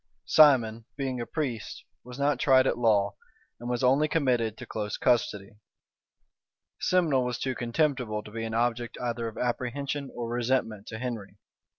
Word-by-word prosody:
Simon, 120 -7 +5
being 130 -3 -2
a 120 - -5
priest, 125 -9 -4 0.2
was 125 +1 -10
not 140 -2 +1
tried 130 -1 +5
at - - +2
law, 105 -4 +2 0.5
and 120 +1 -6
was 125 +1 -1
only 135 +4 +4
committed 125 -8 +1
to - - -8
close 105 -2 -4
custody: 105 -4 0 1.2
Simnel 160 -8 +2
was 125 -1 -2
too 130 - -2
contemptible 120 -4 -1
to 105 - -12
be 115 +1 -4
an 115 0 -3
object 120 0 -1
either 120 -1 -2
of 110 - -8
apprehension 135 +3 -2
or 120 -1 -4
resentment 120 -3 -1
to 110 - -6
Henry. 110 -5 -5
120 Hz, 160 wpm, -28 LUFS, 115-130 Hz, 1.2 s, Simon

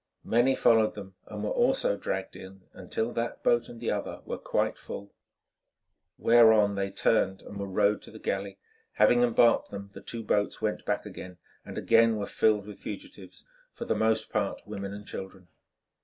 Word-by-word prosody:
Many 120 +4 +3
followed 110 -3 +3
them 100 -2 -9
and 105 -1 -6
were 105 - -1
also 250 - +2
dragged 95 -1 -4
in, 95 0 -12
until 115 +2 -3
that 120 0 -3
boat 120 0 +2
and 115 - -10
the 115 - -1
other - - -4
were - - -5
quite - - 0
full, 100 0 -8 1.0
whereon 110 -3 +5
they 100 0 -2
turned 95 0 +1
and 100 - -9
were 100 - -3
rowed 100 +2 +2
to - - -11
the 110 - -11
galley. 100 -2 -3 0.4
Having 115 +3 +4
embarked 120 -1 +4
them, 100 0 -8
the - - -10
two 115 -1 -6
boats 105 -1 0
went - - -2
back - - -1
and 90 -1 -9 0.4
again 115 0 +4
were 105 - -2
filled 105 -1 +2
with 105 -1 -10
fugitives, 290 0 -9 0.3
for 235 - -6
the - - +1
most 110 0 +1
part 105 -2 -2
women 100 -1 -6
and 105 0 -8
children. 95 -3 -9
105 Hz, 175 wpm, -28 LUFS, 100-115 Hz, 1.0 s, whereon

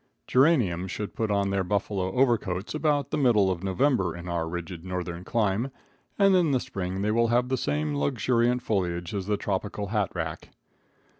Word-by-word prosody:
Geraniums 120 - +3
should 105 +3 -5
put 110 -1 -2
on 100 -1 +1
their 100 -1 +1
buffalo 95 0 -1
overcoats 115 -7 +1
about 150 -2 0
the 150 - 0
middle 105 -8 +4
of 90 0 -4
November 95 - +1
in 85 +1 -8
our 85 -2 -2
rigid 85 0 -6
northern 90 -1 -4
clime, 110 +3 0 0.5
and 195 -1 +5
in 175 -4 +3
the 135 -3 +2
spring 95 -3 -4
they 105 - +1
will 115 +1 +3
have 120 +2 +2
the 130 - +2
same 75 - -1
luxuriant 120 - +1
foliage 85 -5 -1
as 100 -2 -3
the 105 -1 +1
tropical 100 +1 -3
hat 105 -3 0
rack. 80 -2 -4
100 Hz, 175 wpm, -27 LUFS, 90-120 Hz, 0.5 s, and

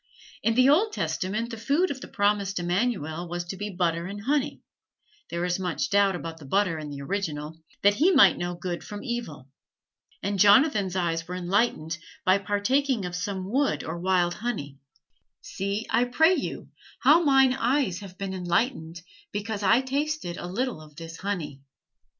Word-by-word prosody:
In 225 - +1
the 255 +1 +5
Old 390 +10 +4
Testament 215 - -2
the 230 - -6
food 285 +10 +1
of 265 -2 -6
the - - -8
promised 205 -2 0
Immanuel 175 -3 -1
was 175 0 -3
to 175 - -6
be 205 +2 -4
butter 170 -2 -1
and 205 +1 -7
honey 290 +2 0 0.7
(there 170 +1 -2
is 180 +1 -1
much 180 -3 -2
doubt 200 -1 +4
about 165 -1 -6
the 150 - -11
butter 175 +2 +1
in 150 -1 -6
the 140 -1 -7
original), 160 -3 -4 0.2
that 205 +1 +6
he 300 - +3
might 200 - +6
know 175 0 -3
good 175 0 -4
from 205 -1 -8
evil; 235 - -5 0.8
and 200 0 -1
Jonathan's 205 - +5
eyes 165 -2 -1
were 180 - -5
enlightened, 180 -3 0 0.3
by 185 +2 +4
partaking 205 +4 0
of 180 0 -5
some 190 +1 -3
wood 280 +3 +1
or 165 +2 -5
wild 180 -1 +2
honey: 175 - -5 0.6
"See, 200 +3 -3
I 235 +2 +3
pray 320 +8 +4
you, - - -4 0.3
how 300 +6 +7
mine 270 -3 +5
eyes 255 -7 0
have 190 -2 -11
been 195 -1 -4
enlightened, 175 -2 -1 0.3
because 205 0 -3
I 205 +5 +4
tasted 280 - -2
a 175 - -6
little 235 -1 -2
of 150 -1 -15
this 165 +1 -9
honey." 175 -9 -4
195 Hz, 175 wpm, -26 LUFS, 175-240 Hz, 0.8 s, how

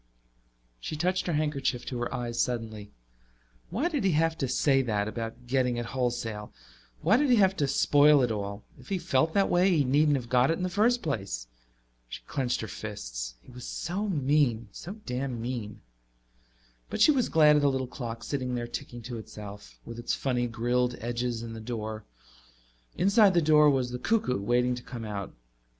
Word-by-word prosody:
She 155 - -5
touched 180 +4 0
her 170 - 0
handkerchief 145 -5 -1
to 125 - -4
her 120 - -2
eyes 120 -1 -3
suddenly. 110 -4 -3 0.8
Why 230 - 0
did 300 - -1
he 190 -3 +3
have 165 +1 +2
to 135 - 0
say 135 +2 +3
that, 105 -5 -1
about 115 +2 -6
getting 125 -1 +1
it 120 - -2
wholesale? 120 -5 -2 0.5
Why 205 +8 +5
did 290 +1 +2
he 245 - +6
have 195 -3 +4
to 145 - +1
spoil 145 +1 +5
it 120 - +1
all? 100 -1 -4 0.2
If - - -15
he 195 - 0
felt 160 -1 +1
that 200 -1 +4
way 180 +2 +3
he 145 - +4
needn't 145 +3 +3
have 125 -3 -3
got 125 +1 +3
it 165 - +1
in 185 - -3
the 185 - 0
first 235 +6 +2
place. 95 - -3 0.6
She - - -8
clenched 130 -3 -1
her 110 - -4
fists. - - -6
He - - -15
was 125 0 -9
so 195 +5 -3
mean, 140 - +1
so 180 - -8
damn 125 -1 -3
mean. 115 -3 -5 1.1
But - - -4
she - - +7
was 260 -4 +1
glad 150 -2 +6
of - - +2
the 145 - +4
little 130 -1 -1
clock 120 -2 -6
sitting 130 -3 -2
there 120 -1 -2
ticking 120 0 -7
to 120 0 -6
itself, 100 - -10
with 115 - -8
its 120 - -1
funny 125 -2 0
grilled 120 +2 0
edges 120 0 -2
and 115 -1 -7
the 110 - -7
door. 110 -2 -5 0.9
Inside 200 0 +5
the - - +6
door 150 -1 +5
was 130 -3 +1
the 125 - -4
cuckoo, 125 - 0
waiting 125 +4 +2
to 125 - -5
come 120 -2 -7
out. 100 -2 -5
125 Hz, 195 wpm, -28 LUFS, 115-150 Hz, 1.1 s, she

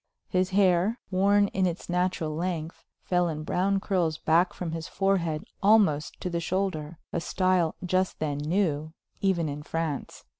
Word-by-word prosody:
His 185 0 +1
hair, 190 +3 +3
worn 200 +2 +4
in 190 -1 +1
its 170 -1 -4
natural 180 -3 0
length, 170 -1 -3 0.2
fell 180 -1 +1
in 155 -1 -4
brown 195 +5 +1
curls 180 -6 0
back 170 +4 +3
from 175 -3 -5
his 165 0 -4
forehead 180 -6 0 0.2
almost 195 -8 +3
to 180 - -2
the 170 - -1
shoulder, 170 -3 -2 0.2
a 170 - -1
style 185 -2 +1
just 185 +1 0
then 145 -2 -2
new, 155 -1 0 0.3
even 185 -5 +1
in 145 0 -4
France. 160 -2 -4
175 Hz, 155 wpm, -27 LUFS, 160-190 Hz, 0.3 s, worn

